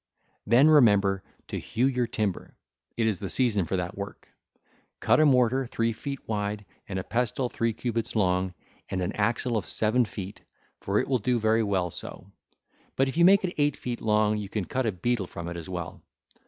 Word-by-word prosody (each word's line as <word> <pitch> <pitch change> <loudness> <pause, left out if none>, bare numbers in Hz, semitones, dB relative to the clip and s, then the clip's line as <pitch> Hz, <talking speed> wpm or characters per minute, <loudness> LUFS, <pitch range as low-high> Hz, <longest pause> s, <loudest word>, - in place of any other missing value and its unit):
Then 120 +7 +6
remember 105 -10 +5 0.3
to - - -3
hew 120 +3 -1
your 125 -3 +1
timber: 105 -5 -3 0.4
it 115 - +1
is 110 -5 0
the 95 - -4
season 110 -8 +1
for 95 - -2
that 90 +1 -3
work. 100 +1 -7 0.7
Cut - - +3
a 155 - +6
mortar 125 -2 +4
1313 135 -2 -2
three 115 0 +1
feet 140 +4 -7
wide 105 -1 -2 0.2
and 95 - -3
a 95 - -2
pestle 125 +3 -1
three 115 -1 0
cubits 115 0 -3
long, 90 -2 +1 0.3
and 95 - -2
an 90 - -1
axle 115 +3 0
of 95 -7 -3
seven 115 +3 +2
feet, 100 -2 -8 0.4
for 100 +1 -1
it - - +1
will 130 -2 +1
do 120 +3 +1
very 110 +1 +2
well 95 -5 0
so; - - -6 0.7
but 135 0 +2
if 135 - -6
you 170 - +4
make 195 +3 +6
it 180 - -3
eight 145 -1 +2
feet 120 -1 -5
long, 105 0 +2
you 105 -2 -5
can 105 -2 -2
cut 130 +8 -1
a - - +2
beetle 105 +2 -1
1314 - - -13
from 85 0 -6
it 85 - -6
as 85 +1 -7
well. 85 -4 -6
110 Hz, 210 wpm, -27 LUFS, 100-125 Hz, 0.7 s, Then